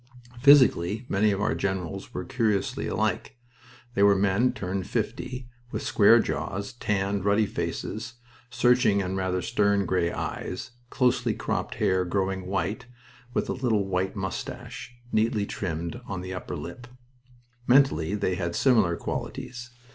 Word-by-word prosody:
Physically, 125 -6 +5
many 105 +2 +3
of 100 -1 0
our 105 - +1
generals 95 -1 -3
were 90 - -5
curiously 110 -6 0
alike. - - -1 0.6
They 100 - 0
were 100 0 +6
men 100 +6 +2
turned 95 0 -4
fifty, 125 -1 -3 0.2
with - - -3
square - - +6
jaws, 100 +6 -3
tanned, 100 -4 -1
ruddy 100 +2 +3
faces, 115 +3 -4 0.3
searching 125 -3 +3
and 95 -1 -2
rather 95 -1 -1
stern 100 0 +2
gray 85 -1 +1
eyes, - - -5 0.2
closely 125 0 +1
cropped - - -3
hair 95 0 +2
growing 95 0 -1
white, 100 +6 -2 0.5
with - - 0
a - - -1
little 115 -6 +1
white 95 +1 -1
mustache, 95 +5 -6 0.2
neatly 110 -1 +1
trimmed, 85 +4 -4
on 95 -2 -4
the 95 0 -6
upper 90 -1 -5
lip. 90 +11 -8 0.8
Mentally 120 - +4
they 100 -3 0
had 85 -1 -2
similar 110 -10 +3
qualities. 120 +7 -5
100 Hz, 140 wpm, -26 LUFS, 95-120 Hz, 0.8 s, were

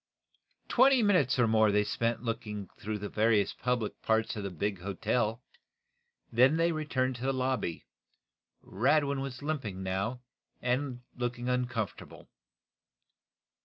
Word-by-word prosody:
Twenty 260 -1 +5
minutes 180 - +3
or 120 -2 +4
more 110 -1 +4
they 105 +1 +3
spent 115 +2 -1
in - - -11
looking 105 -4 -4
through 105 +1 -3
the 105 0 -5
various 110 -1 +2
public 125 -3 -2
parts 110 0 +1
of 105 - -4
the 100 - -3
big 95 +2 -2
hotel. 110 +5 -1 0.9
Then 130 +6 +5
they 170 +1 +3
returned 130 -5 -1
to - - -12
the 135 +1 +1
lobby. 130 -9 -2 0.8
Radwin 140 +6 +1
was 135 0 -6
limping, 125 -11 -3
now, 100 +7 -2 0.4
and 125 0 -1
looked 120 -1 -2
uncomfortable. 120 -3 -3
120 Hz, 130 wpm, -30 LUFS, 105-130 Hz, 0.9 s, Twenty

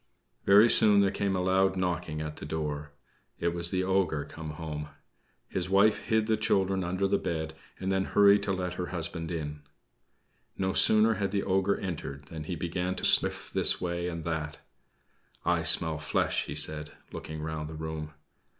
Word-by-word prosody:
Very 105 +3 +7
soon 105 -3 +7
there 100 -1 +2
came 100 -1 -1
a 90 - 0
loud 95 +1 +2
knocking 85 -4 -2
at 75 -1 -6
the - - -8
door. 75 -2 -4 0.5
It 85 - 0
was 85 0 0
the 95 0 -1
ogre 95 -6 0
come 80 +1 -8
home. 75 -1 -6 0.6
His 90 -1 -3
wife 100 +3 +4
hid 110 -1 0
the 110 0 +2
children 95 -3 +1
under 95 +3 -1
the 100 0 +1
bed, 80 -1 -3 0.3
and 95 - -2
then 95 0 +1
hurried 100 0 +5
to 100 - -1
let 90 -2 -2
her 90 0 -4
husband 85 -1 -4
in. 75 -3 -5 1.0
No 95 0 -1
sooner 110 +1 +5
had 100 -2 -2
the 100 0 -1
ogre 95 +1 +1
entered 75 -6 -6
than 80 -2 -7
he 90 - -4
began 90 +3 -3
to - - -2
sniff - - +2
this - - +2
way 85 0 -3
and 85 -2 -5
that. 80 -3 -3 0.9
"I - - +2
smell 80 -1 +3
flesh," 80 - 0
he - - -6
said, 75 0 -2 0.2
looking 80 0 -7
round 80 -1 -4
the 80 - -8
room. 80 -1 -6
90 Hz, 180 wpm, -28 LUFS, 80-95 Hz, 1.0 s, Very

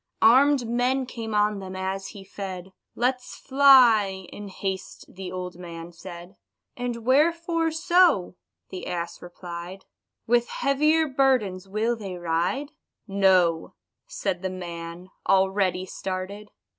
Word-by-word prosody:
Arm'd 265 +2 +5
men 250 +3 +1
came 225 -3 -5
on 210 0 +2
them 190 -1 -7
as 190 +1 -3
he 200 -2 -10
fed: 190 -1 -7 0.2
"Let's 250 +1 -1
fly," 240 -9 +5
in 205 - -8
haste 190 -1 -5
the 185 -1 -8
old 180 -1 -6
man 170 -1 -8
said. 175 +2 -11 0.4
"And 240 -2 -4
wherefore 330 +4 +2
so?" 320 - +3 0.4
the 185 - -6
ass 170 -1 -4
replied; 175 +1 -9 0.4
"With 240 +1 +2
heavier 305 +4 +2
burdens 255 -9 +1
will 220 +4 0
they 195 -5 -7
ride?" 175 - -1 0.4
"No," 185 -4 +2 0.3
said - - -3
the 190 - -2
man, 175 0 -7 0.2
already 190 -1 +2
started. 190 +3 -6
195 Hz, 120 wpm, -25 LUFS, 185-250 Hz, 0.4 s, Arm'd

